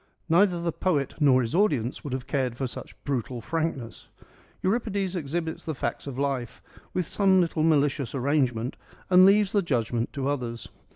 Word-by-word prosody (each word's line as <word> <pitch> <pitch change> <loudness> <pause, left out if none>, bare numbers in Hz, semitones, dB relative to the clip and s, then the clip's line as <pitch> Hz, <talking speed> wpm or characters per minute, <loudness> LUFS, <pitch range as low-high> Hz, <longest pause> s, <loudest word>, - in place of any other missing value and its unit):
Neither 175 +1 +4
the 170 0 -1
poet 150 -6 0
nor 135 -4 +5
his 115 -2 -3
audience 145 - +1
would 145 - -5
have 130 0 -3
cared 130 -3 -1
for 135 - -1
such 125 - -8
brutal 125 -3 -2
frankness. 150 -2 -3 0.6
Euripides 200 -2 0
exhibits 160 0 -3
the 160 - -4
facts 145 - -3
of 135 -2 -6
life, 135 -4 -2 0.3
with 180 - -1
some 190 +1 +3
little 170 -3 +1
malicious 145 -4 +2
arrangement, 130 -3 0 0.3
and 185 +1 +8
leaves 200 0 +4
the 205 - +3
judgment 120 - -1
to 135 -1 -2
others. 120 -5 -3
145 Hz, 165 wpm, -26 LUFS, 130-175 Hz, 0.6 s, and